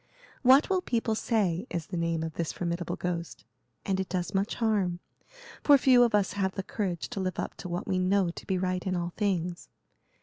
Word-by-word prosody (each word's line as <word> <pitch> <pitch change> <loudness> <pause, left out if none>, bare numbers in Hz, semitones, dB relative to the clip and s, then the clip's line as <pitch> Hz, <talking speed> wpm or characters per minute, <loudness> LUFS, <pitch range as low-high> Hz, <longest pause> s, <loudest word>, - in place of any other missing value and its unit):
'What 265 +3 +6
will 375 -1 +1
people 230 -7 0
say?' 210 -3 0
is 170 -2 -3
the 185 - -6
name 170 -1 0
of 160 -1 -4
this 165 0 -2
formidable 170 -1 -3
ghost; 170 - -4 0.4
and 190 -1 0
it 190 - -2
does 180 -2 -2
much 195 +2 0
harm, 200 -6 0 0.6
for 290 -1 +7
few 255 -2 +5
of 235 -3 +4
us 195 -3 +1
have 190 -2 -1
the 195 - -3
courage 185 -5 -3
to - - -5
live 185 -1 -2
up - - -3
to 180 - -7
what 175 +1 -3
we 185 -2 +1
know 185 -1 +2
to - - -11
be 190 - +1
right 185 0 -1
in 185 - 0
all 175 0 -3
things. 180 -4 -2
185 Hz, 210 wpm, -28 LUFS, 175-210 Hz, 0.6 s, for